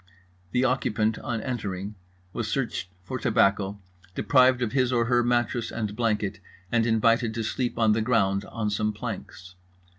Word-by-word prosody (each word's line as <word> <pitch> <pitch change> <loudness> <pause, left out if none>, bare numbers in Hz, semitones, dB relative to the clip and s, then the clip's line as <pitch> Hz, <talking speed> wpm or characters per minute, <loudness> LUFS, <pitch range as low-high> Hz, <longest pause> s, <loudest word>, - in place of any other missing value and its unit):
The 125 - +2
occupant 110 -4 +1
on 115 -3 -3
entering 100 -6 -4 0.4
was 115 - -3
searched 115 -6 -2
for 130 +7 -5
tobacco, 100 -4 +2 0.4
deprived 130 -2 +4
of 110 - -1
his 130 -2 +2
or 120 -2 +2
her 120 0 +3
mattress 120 -1 0
and 105 -3 -3
blanket, 105 -4 -1 0.3
and 115 -1 +2
invited 115 0 +2
to 115 - -2
sleep 120 +2 -2
on 110 -2 +4
the 110 +1 +2
ground 100 -4 +2
on 110 -3 -3
some 105 +1 0
planks. 105 -4 -7
115 Hz, 155 wpm, -26 LUFS, 105-120 Hz, 0.4 s, deprived